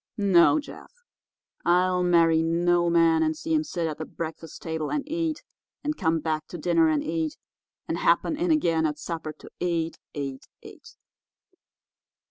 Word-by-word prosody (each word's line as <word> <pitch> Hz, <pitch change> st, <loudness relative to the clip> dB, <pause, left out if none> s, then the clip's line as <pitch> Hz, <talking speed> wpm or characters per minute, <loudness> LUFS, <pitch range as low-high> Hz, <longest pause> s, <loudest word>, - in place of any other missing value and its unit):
No, 200 Hz, -, +5 dB
Jeff; 295 Hz, -, -11 dB, 0.7 s
I'll 180 Hz, +1 st, +3 dB
marry 165 Hz, -2 st, +4 dB
no 175 Hz, +1 st, +2 dB
man 165 Hz, -1 st, +4 dB
and 155 Hz, -1 st, 0 dB
see 325 Hz, -, -3 dB
him 310 Hz, -1 st, +2 dB
sit 175 Hz, -, -3 dB
at 155 Hz, -2 st, -4 dB
the 155 Hz, -, -4 dB
breakfast 165 Hz, 0 st, -7 dB
table 160 Hz, -2 st, -3 dB
and 290 Hz, -1 st, -2 dB
eat, 325 Hz, 0 st, -2 dB, 0.4 s
and 300 Hz, +1 st, -1 dB
come 165 Hz, -, +1 dB
back 155 Hz, 0 st, -2 dB
to 175 Hz, -, -7 dB
dinner 165 Hz, 0 st, +3 dB
and 155 Hz, -2 st, +1 dB
eat, 160 Hz, -1 st, -2 dB, 0.5 s
and -, -, -2 dB
happen 315 Hz, -, +2 dB
in 345 Hz, +4 st, -1 dB
again 165 Hz, -, +2 dB
at 150 Hz, -1 st, -4 dB
supper 160 Hz, -1 st, -5 dB
to -, -, -15 dB
eat, 165 Hz, -2 st, -1 dB, 0.2 s
eat, 135 Hz, -2 st, -5 dB, 0.2 s
eat. -, -, -14 dB
165 Hz, 160 wpm, -26 LUFS, 160-180 Hz, 0.7 s, No